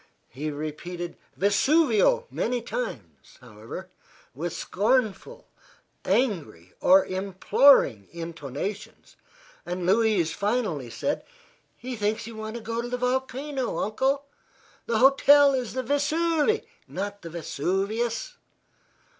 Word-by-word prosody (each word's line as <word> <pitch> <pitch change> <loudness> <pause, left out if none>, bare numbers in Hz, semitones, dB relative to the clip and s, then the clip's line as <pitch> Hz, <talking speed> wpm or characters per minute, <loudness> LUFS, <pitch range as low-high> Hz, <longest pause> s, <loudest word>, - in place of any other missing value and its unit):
He 145 +5 -4
repeated 155 +4 -5 0.2
"Vesuvio" 290 - +3
many 245 +1 -1
times, 105 - -6
however, 110 -2 -10 0.4
with 165 +6 -4
scornful, 245 - -1 0.6
angry 180 - -1
or 190 +1 +6
imploring 190 - +3
intonations, 170 +4 -6 0.5
and 180 0 -4
Louise 200 -4 +2
finally 200 - -1
said: 285 - -2 0.5
"He 255 0 -6
thinks 215 0 -1
you 230 0 -9
want 220 +1 -6
to 235 - -6
go 230 +1 -2
to 240 - -6
the 250 - -2
volcano, 260 +2 -2
Uncle. 265 +7 0 0.6
The 230 - +1
hotel 275 +3 +6
is 250 -4 -2
the 260 +1 -2
Vesuve, 315 - +1 0.2
not 200 +1 -5
the 165 - -8
Vesuvius." 200 - -2
215 Hz, 105 wpm, -26 LUFS, 175-260 Hz, 0.6 s, or